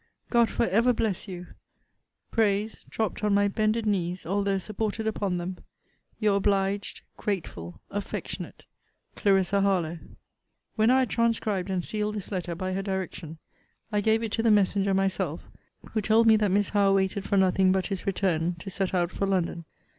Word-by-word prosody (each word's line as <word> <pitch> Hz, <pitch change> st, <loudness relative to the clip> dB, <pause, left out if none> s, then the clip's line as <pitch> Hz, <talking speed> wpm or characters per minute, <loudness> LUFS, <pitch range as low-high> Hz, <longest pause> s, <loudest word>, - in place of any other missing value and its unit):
God 235 Hz, -2 st, +4 dB
for -, -, 0 dB
ever 230 Hz, +6 st, +3 dB
bless 215 Hz, -4 st, -1 dB
you! 180 Hz, -2 st, -7 dB, 0.9 s
prays, 215 Hz, 0 st, +1 dB
dropt 220 Hz, -1 st, -2 dB
on 210 Hz, -1 st, +3 dB
my 205 Hz, 0 st, +4 dB
bended 215 Hz, +2 st, 0 dB
knees, 180 Hz, -3 st, -1 dB
although 200 Hz, +2 st, 0 dB
supported 215 Hz, +3 st, -3 dB
upon 200 Hz, -4 st, -1 dB
them, 180 Hz, +1 st, -5 dB, 0.6 s
Your 210 Hz, -2 st, +3 dB
obliged, 200 Hz, 0 st, 0 dB, 0.2 s
grateful, 90 Hz, -, -4 dB
affectionate, 205 Hz, 0 st, -5 dB, 0.5 s
CL. 195 Hz, -2 st, +3 dB, 0.2 s
HARLOWE. 175 Hz, -4 st, +1 dB, 0.8 s
When 220 Hz, +1 st, +3 dB
I 260 Hz, +1 st, +5 dB
had 255 Hz, -, 0 dB
transcribed 215 Hz, -5 st, 0 dB
and 185 Hz, -2 st, -1 dB
sealed 210 Hz, 0 st, -2 dB
this 205 Hz, -1 st, -6 dB
letter, 180 Hz, -3 st, -3 dB
by 185 Hz, +2 st, -3 dB
her 195 Hz, -, -1 dB
direction, 185 Hz, -4 st, -4 dB, 0.5 s
I 210 Hz, -1 st, +1 dB
gave 220 Hz, +2 st, +2 dB
it 225 Hz, -, -3 dB
to 225 Hz, -, 0 dB
the 230 Hz, -, +3 dB
messenger 200 Hz, -1 st, +3 dB
myself, 190 Hz, -4 st, 0 dB, 0.5 s
who 220 Hz, -, 0 dB
told 220 Hz, +3 st, +4 dB
me 220 Hz, -1 st, +7 dB
that 210 Hz, -1 st, +1 dB
Miss 200 Hz, +1 st, +2 dB
Howe 200 Hz, -1 st, +3 dB
waited 190 Hz, 0 st, 0 dB
for 200 Hz, -, 0 dB
nothing 190 Hz, 0 st, +4 dB
but 190 Hz, -1 st, +1 dB
his 195 Hz, -2 st, -4 dB
return 180 Hz, -3 st, 0 dB
to 180 Hz, +4 st, -8 dB
set 190 Hz, 0 st, -1 dB
out 175 Hz, -1 st, +1 dB
for 195 Hz, -, -2 dB
London. 175 Hz, -3 st, -1 dB
195 Hz, 170 wpm, -27 LUFS, 185-215 Hz, 0.9 s, me